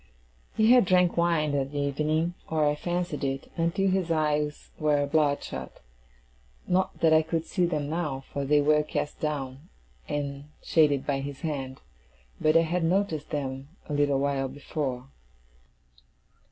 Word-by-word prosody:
He 220 Hz, +2 st, +5 dB
had 250 Hz, -4 st, +7 dB
drank 180 Hz, -1 st, +3 dB
wine 170 Hz, -3 st, +2 dB
that 140 Hz, 0 st, -2 dB
evening 150 Hz, +4 st, 0 dB, 0.2 s
(or 155 Hz, -2 st, +2 dB
I 145 Hz, -, +3 dB
fancied 175 Hz, -1 st, -3 dB
it), 135 Hz, 0 st, -3 dB
until 170 Hz, +4 st, +1 dB
his 185 Hz, -2 st, 0 dB
eyes 150 Hz, -2 st, 0 dB
were 150 Hz, -2 st, +2 dB
bloodshot. 140 Hz, -, -1 dB, 0.9 s
Not 185 Hz, +1 st, 0 dB
that 160 Hz, -1 st, +5 dB
I 160 Hz, -, +6 dB
could 160 Hz, +1 st, -2 dB
see 180 Hz, -3 st, +1 dB
them 150 Hz, -4 st, -2 dB
now, 150 Hz, -4 st, -2 dB
for 140 Hz, -, -2 dB
they 145 Hz, +1 st, +3 dB
were 150 Hz, +1 st, +4 dB
cast 150 Hz, -1 st, -4 dB
down, 145 Hz, 0 st, -4 dB, 0.4 s
and 140 Hz, -1 st, -3 dB, 0.2 s
shaded 145 Hz, -4 st, +3 dB
by 140 Hz, -2 st, 0 dB
his 140 Hz, 0 st, -6 dB
hand; 135 Hz, -5 st, -4 dB, 0.6 s
but 155 Hz, +1 st, +4 dB
I -, -, +6 dB
had 170 Hz, +2 st, -1 dB
noticed 165 Hz, -3 st, 0 dB
them 135 Hz, -2 st, -4 dB, 0.2 s
a 150 Hz, -, -4 dB
little 145 Hz, -1 st, +2 dB
while 135 Hz, -1 st, 0 dB
before. 135 Hz, -2 st, -4 dB
150 Hz, 150 wpm, -27 LUFS, 140-165 Hz, 0.9 s, had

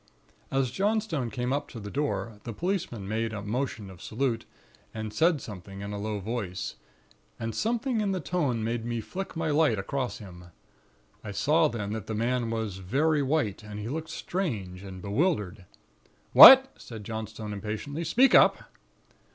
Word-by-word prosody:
"As 135 Hz, -2 st, 0 dB
Johnstone 200 Hz, -, 0 dB
came 125 Hz, +3 st, -2 dB
up 145 Hz, -, -2 dB
to 115 Hz, -, -8 dB
the 105 Hz, -1 st, -7 dB
door, 135 Hz, -7 st, -2 dB
the 115 Hz, -, -6 dB
policeman 165 Hz, -, -3 dB
made 110 Hz, +1 st, -2 dB
a 105 Hz, -1 st, -5 dB
motion 115 Hz, -1 st, -3 dB
of 90 Hz, -, -14 dB
salute, 115 Hz, -1 st, -2 dB, 0.5 s
and 110 Hz, -1 st, -5 dB
said 160 Hz, +5 st, +3 dB
something 100 Hz, -1 st, -9 dB
in 100 Hz, 0 st, -5 dB
a 100 Hz, -, -4 dB
low 105 Hz, 0 st, -3 dB
voice; 100 Hz, -4 st, -4 dB, 0.7 s
and 115 Hz, -1 st, -3 dB
something 235 Hz, +1 st, 0 dB
in 200 Hz, -2 st, 0 dB
the 190 Hz, -, -1 dB
tone 145 Hz, -9 st, -1 dB
made 115 Hz, +1 st, -2 dB
me 120 Hz, 0 st, -2 dB
flick 185 Hz, -, -6 dB
my 160 Hz, -1 st, -1 dB
light 145 Hz, -7 st, +3 dB
across 125 Hz, +6 st, -3 dB
him. 90 Hz, -6 st, -11 dB, 0.8 s
I 105 Hz, -, -7 dB
saw 150 Hz, +11 st, +3 dB
then 105 Hz, -6 st, -4 dB
that 110 Hz, -1 st, -5 dB
the 110 Hz, -, -3 dB
man 120 Hz, +1 st, 0 dB
was 110 Hz, -4 st, -3 dB
very 145 Hz, -, +1 dB
white, 135 Hz, -8 st, 0 dB
and 105 Hz, -1 st, -8 dB
he 105 Hz, +2 st, -5 dB
looked 160 Hz, +3 st, -4 dB
strange 105 Hz, -, -4 dB
and 95 Hz, -2 st, -9 dB
bewildered. 105 Hz, -, -1 dB, 0.7 s
"'What?' 265 Hz, 0 st, +11 dB
said 110 Hz, -3 st, -9 dB
Johnstone 110 Hz, -1 st, -6 dB
impatiently. 110 Hz, +10 st, -4 dB
'Speak 245 Hz, -, +4 dB
up!' -, -, +7 dB
115 Hz, 165 wpm, -28 LUFS, 105-155 Hz, 0.8 s, What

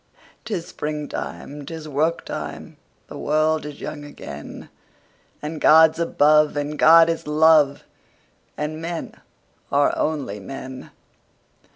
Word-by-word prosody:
'Tis 185 Hz, -6 st, -3 dB
springtime! 150 Hz, -1 st, -6 dB
'Tis 160 Hz, +1 st, -8 dB
work 155 Hz, +3 st, -1 dB
time! -, -, -7 dB, 0.3 s
The -, -, -10 dB
world 155 Hz, 0 st, +1 dB
is 145 Hz, -1 st, -9 dB
young 150 Hz, -1 st, -6 dB
again! 75 Hz, -, -10 dB, 0.7 s
And 155 Hz, +1 st, -5 dB
God's 160 Hz, +1 st, +6 dB
above, 150 Hz, -2 st, +3 dB
and 145 Hz, +1 st, -3 dB
God 165 Hz, +1 st, +7 dB
is 165 Hz, -2 st, -3 dB
love, 150 Hz, -2 st, +4 dB, 0.7 s
And 155 Hz, +1 st, -4 dB
men 165 Hz, 0 st, -5 dB, 0.6 s
are 145 Hz, 0 st, +3 dB
only 140 Hz, -10 st, -2 dB
men. 130 Hz, +4 st, -8 dB
150 Hz, 110 wpm, -22 LUFS, 145-160 Hz, 0.7 s, God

